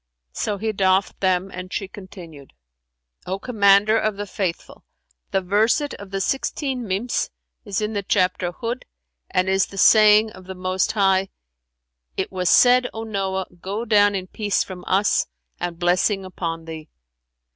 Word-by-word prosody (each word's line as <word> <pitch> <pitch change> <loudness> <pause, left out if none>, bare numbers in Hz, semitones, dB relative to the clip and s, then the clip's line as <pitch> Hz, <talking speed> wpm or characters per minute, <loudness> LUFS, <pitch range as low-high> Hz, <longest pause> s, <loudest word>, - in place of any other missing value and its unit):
So 205 - -2
he 220 +2 -2
doffed 190 -1 +1
them, 185 0 +1
and 185 0 -8
she 195 - -3
continued, 175 -7 -12 0.7
"O 190 +1 -2
Commander 205 -1 +4
of 215 -2 -1
the 205 - -4
Faithful, 190 -3 -4 0.5
the 195 -2 0
verset 220 - +1
of 200 -1 -10
the 195 0 -3
sixteen 265 +1 -2
Mims 200 +6 -1 0.4
is 200 0 -2
in 215 +1 -2
the 205 - -1
chapter 185 -2 0
Hϊd 230 +8 -4 0.5
and 185 +1 +1
is 190 0 +2
the 195 - -12
saying 215 +1 +6
of 185 - -14
the 190 0 -7
Most 185 +3 -1
High, 195 -2 +2 0.9
'It - - -2
was 180 -2 0
said, 250 0 +5
O 225 - -4
Noah, 195 -3 -2 0.2
go 205 +5 -4
down 205 -2 +4
in 185 -1 -3
peace 205 +1 -1
from 180 -2 -9
us, 195 +2 +2 0.3
and 175 -1 -4
blessing 185 +3 +1
upon 165 -3 -5
thee!' 160 -1 -8
195 Hz, 155 wpm, -22 LUFS, 185-215 Hz, 0.9 s, saying